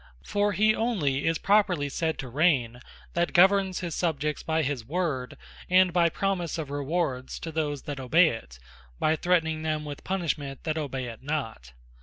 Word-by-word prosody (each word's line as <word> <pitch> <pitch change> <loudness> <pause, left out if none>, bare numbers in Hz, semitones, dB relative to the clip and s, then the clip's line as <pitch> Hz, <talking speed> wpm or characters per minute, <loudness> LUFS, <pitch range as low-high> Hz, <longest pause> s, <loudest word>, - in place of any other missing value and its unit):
For 205 0 0
he 215 +3 +4
onely 170 - 0
is 165 0 +2
properly 195 -8 +2
said 160 +3 -2
to 135 - -5
Raigne, 130 -4 +2 0.4
that 170 0 0
governs 190 +1 +4
his 170 -3 -4
Subjects, 150 -3 -1
by 160 0 0
his 135 -4 -2
Word, 145 -3 -2 0.3
and 185 -1 +5
by 170 -1 +4
promise 180 -2 -2
of 150 -4 -5
Rewards 145 -2 -2
to 165 - -6
those 150 -3 -2
that 145 -2 -5
obey 160 +7 +4
it, 65 - -7
and - - -24
by 155 - +2
threatning 160 -2 +1
them 155 -1 -2
with 145 -1 -7
Punishment 155 -7 -3
that 155 -1 -1
obey 135 -4 -3
it 115 -2 -8
not. 120 - -4
155 Hz, 175 wpm, -27 LUFS, 135-175 Hz, 0.4 s, and